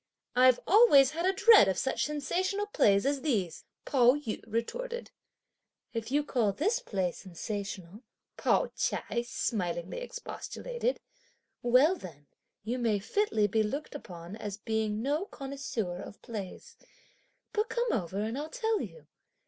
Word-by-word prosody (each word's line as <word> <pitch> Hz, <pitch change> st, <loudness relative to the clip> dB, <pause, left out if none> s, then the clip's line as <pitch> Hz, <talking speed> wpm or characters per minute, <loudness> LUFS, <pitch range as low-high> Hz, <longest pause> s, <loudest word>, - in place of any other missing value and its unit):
"I've 255 Hz, 0 st, +6 dB
always 330 Hz, -, +7 dB
had 335 Hz, +3 st, -1 dB
a -, -, +5 dB
dread 420 Hz, -, +7 dB
of 190 Hz, -1 st, 0 dB
such 265 Hz, -, 0 dB
sensational 355 Hz, +8 st, -1 dB
plays 210 Hz, -, +3 dB
as 280 Hz, -1 st, +1 dB
these!" 200 Hz, -, -1 dB, 0.2 s
Pao 250 Hz, -1 st, +5 dB
yü 290 Hz, -7 st, -5 dB
retorted. 475 Hz, -, -3 dB, 0.8 s
"If 230 Hz, -1 st, -3 dB
you 290 Hz, +3 st, +2 dB
call 235 Hz, -8 st, +1 dB
this 420 Hz, -, +1 dB
play 190 Hz, -, -1 dB
sensational," 195 Hz, +1 st, -6 dB, 0.3 s
Pao -, -, +2 dB
ch'ai 235 Hz, -, -1 dB
smilingly 180 Hz, -, -2 dB
expostulated, -, -, -4 dB, 0.6 s
"well 255 Hz, +9 st, +5 dB
then 160 Hz, -, -11 dB, 0.4 s
you 240 Hz, +4 st, -2 dB
may 225 Hz, -4 st, +2 dB
fitly 220 Hz, -, +1 dB
be 220 Hz, +2 st, +2 dB
looked 275 Hz, +8 st, -3 dB
upon 175 Hz, -, -8 dB
as 205 Hz, -3 st, -5 dB
being 220 Hz, 0 st, -1 dB
no 295 Hz, +7 st, 0 dB
connoisseur 265 Hz, -, -4 dB
of 200 Hz, -, -10 dB
plays. 230 Hz, -, -7 dB, 0.8 s
But 430 Hz, +1 st, 0 dB
come 475 Hz, 0 st, 0 dB
over 185 Hz, -4 st, -2 dB
and 225 Hz, +5 st, -2 dB
I'll 305 Hz, +2 st, -5 dB
tell 445 Hz, -1 st, 0 dB
you. 485 Hz, -, -8 dB
245 Hz, 140 wpm, -30 LUFS, -, 0.8 s, always